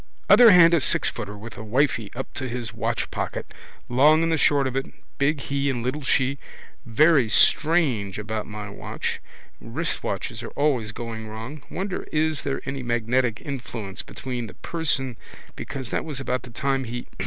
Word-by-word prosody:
Other 245 -2 +10
hand 175 -3 +8
a - - +6
sixfooter 105 -6 -1
with 115 +2 -10
a - - -6
wifey 115 -1 +1
up 135 - -6
to 130 -2 -4
his 120 -3 -4
watchpocket. 110 - -3 0.3
Long 150 +6 +5
and 165 - +1
the - - +3
short 145 -2 +3
of 130 -1 -2
it. 135 - -1 0.3
Big 140 +1 +2
he 140 0 -1
and 120 -3 -2
little 130 +5 -2
she. 135 0 +1 0.5
Very 135 0 +4
strange 135 - +3
about 105 0 -4
my 105 -1 -6
watch. 100 - -4 0.4
Wristwatches - - -3
are - - -6
always 130 -8 +1
going 110 -1 -6
wrong. 115 +7 -7
Wonder 190 0 -4
is 155 -1 +1
there 140 -1 -3
any 135 0 -3
magnetic 120 0 0
influence 115 -8 -5
between 125 -3 -5
the - - -12
person 135 -7 -1 0.4
because 130 -2 -6
that - - 0
was 150 -5 -5
about 130 -2 -1
the 125 - -11
time 135 +3 -1
he. 120 +1 -5
130 Hz, 165 wpm, -24 LUFS, 115-145 Hz, 0.5 s, Other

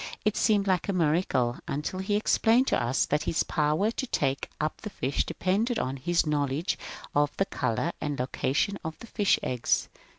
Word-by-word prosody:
It 210 -1 +2
seemed 210 -3 +3
like 185 0 +1
a - - +2
miracle, 150 -8 +1
until 150 +6 -3
he 200 +2 0
explained 225 +3 +3
to - - +2
us 120 +3 +1
that 150 +1 0
his 165 - +1
power 155 +7 +1
to 260 +3 -3
take 135 - -1
up 155 0 -2
the 210 - -5
fish 140 -8 -1
depended 220 +6 0
upon 130 +1 -2
his 170 +6 +1
knowledge 145 +1 0 0.4
of 145 0 +1
the 195 - +2
colour 130 - -1
and 145 -1 -2
location 140 +9 0
of 160 0 -5
the - - -10
fish's 205 -3 +2
eggs. 125 -2 0
160 Hz, 185 wpm, -28 LUFS, 140-200 Hz, 0.4 s, seemed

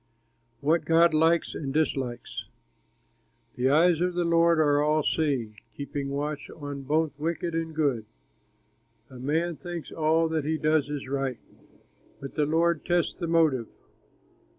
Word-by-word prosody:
WHAT 160 +4 +2
GOD 165 0 +4
LIKES 165 +2 +2
AND 135 -2 -5
DISLIKES 130 -6 -2 1.1
The 125 +1 +1
eyes 165 +3 +4
of 180 0 0
the 175 - +1
Lord 170 -1 +3
are 145 -2 +3
all 150 +1 +2
seeing, 130 -11 -1 0.2
Keeping 140 -1 -4
watch 145 +1 -3
on 145 -3 -7
both 155 +3 +1
wicked 170 +2 -2
and 165 -1 -3
good. 140 -8 0 1.1
A 130 - -10
man 160 +5 -1
thinks 175 -3 -7
all 160 +1 +2
that 160 -2 -1
he 160 +2 -1
does 155 -2 +1
is 145 -3 -5
right, 135 -2 -2 0.8
But 135 - -8
the 150 -1 +1
Lord 165 +1 +1
tests 175 -1 +1
the 170 - -5
motive. 155 -8 +2
155 Hz, 145 wpm, -27 LUFS, 140-165 Hz, 1.1 s, GOD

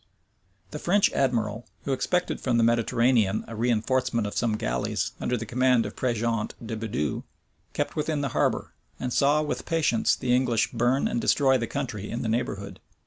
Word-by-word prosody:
The 150 - -5
French 195 +5 +3
admiral, 115 -4 0 0.2
who 140 - -1
expected 180 +7 -1
from 125 -3 +1
the 115 - +4
Mediterranean 115 -2 +2
a - - -8
reënforcement 115 0 +1
of 105 - -4
some 110 -2 +1
galleys - - -1
under 125 - 0
the 115 - -5
command 125 +1 +2
of - - -6
Prejeant 115 -3 -1
de 115 - -4
Bidoux, 105 -9 -2 0.5
kept - - -2
within 150 -1 -1
the 140 - -1
harbor, - - 0 0.3
and 125 -1 -3
saw 145 +2 +3
with 150 - -4
patience 160 -9 +2
the 125 -2 0
English 125 -3 +1
burn 120 +3 +1
and 120 - -1
destroy 135 -2 +3
the 115 - -2
country 120 -7 -4
in 120 - -3
the 115 - -1
neighborhood. 100 -4 -3
120 Hz, 175 wpm, -26 LUFS, 110-130 Hz, 0.5 s, the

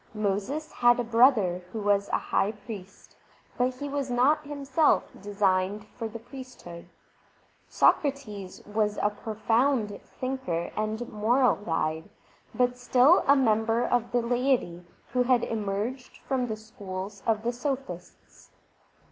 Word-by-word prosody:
Moses 215 +10 -2
had 240 0 +4
a - - +1
brother 225 -6 +4
who 225 - -4
was 200 -1 +1
a - - +2
high 205 +3 0
priest, 205 -3 -11 0.4
but 250 +1 0
he 285 +3 -5
was 280 -1 -3
not 270 +5 +3
himself 290 +1 +2 0.2
designed 200 0 0
for 230 - -4
the 220 +1 -7
priesthood. 245 -8 -11 0.8
Sokrates 215 -10 0
was 210 0 -1
a 210 - +1
profound 220 +1 0 0.2
thinker 255 -11 -2
and 215 +2 -2
moral 240 +5 +2
guide, 160 -2 -2 0.5
but 250 0 +1
still 255 +7 +5
a 280 - +7
member 225 -2 +2
of 240 -1 0
the 240 -1 +1
laity 240 -8 0 0.3
who 250 - +2
had 250 -1 +3
emerged 220 +4 -3
from 260 -2 0
the 220 -1 -4
schools 200 -3 -8
of 220 -1 +1
the 240 +1 0
sophists. 245 - -6
225 Hz, 130 wpm, -27 LUFS, 205-255 Hz, 0.8 s, a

